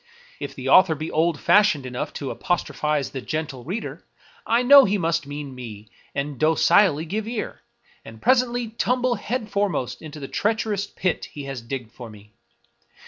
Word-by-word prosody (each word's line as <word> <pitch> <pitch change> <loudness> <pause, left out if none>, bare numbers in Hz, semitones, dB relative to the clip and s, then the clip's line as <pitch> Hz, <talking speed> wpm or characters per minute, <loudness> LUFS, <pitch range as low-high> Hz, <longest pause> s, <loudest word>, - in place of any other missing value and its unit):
If - - -6
the - - -6
author 185 -4 +6
be 155 +2 -5
old 160 -1 +1
fashioned 175 -6 +4
enough 125 -1 -4
to 140 - -4
apostrophize 150 -5 -1
the 135 - -5
Gentle 145 -4 -4
Reader, 190 - -5 0.4
I 235 +2 +3
know 280 +2 +9
he 205 -3 +1
must 165 -4 -1
mean 145 -1 -6
me, 110 -4 -9 0.3
and 140 -1 -3
docilely 160 +1 +4
give 210 +6 -3
ear, 230 -2 -4 0.4
and 110 0 -12
presently 245 - +2
tumble 250 +2 0
head 240 -2 -4
foremost 195 -11 -1
into 155 -1 -9
the 135 - -6
treacherous 210 0 -1
pit 180 -3 -2
he 145 - -9
has 135 -3 -6
digged 115 -1 -6
for 120 -2 -10
me. 105 0 -15
160 Hz, 165 wpm, -23 LUFS, 135-210 Hz, 0.4 s, know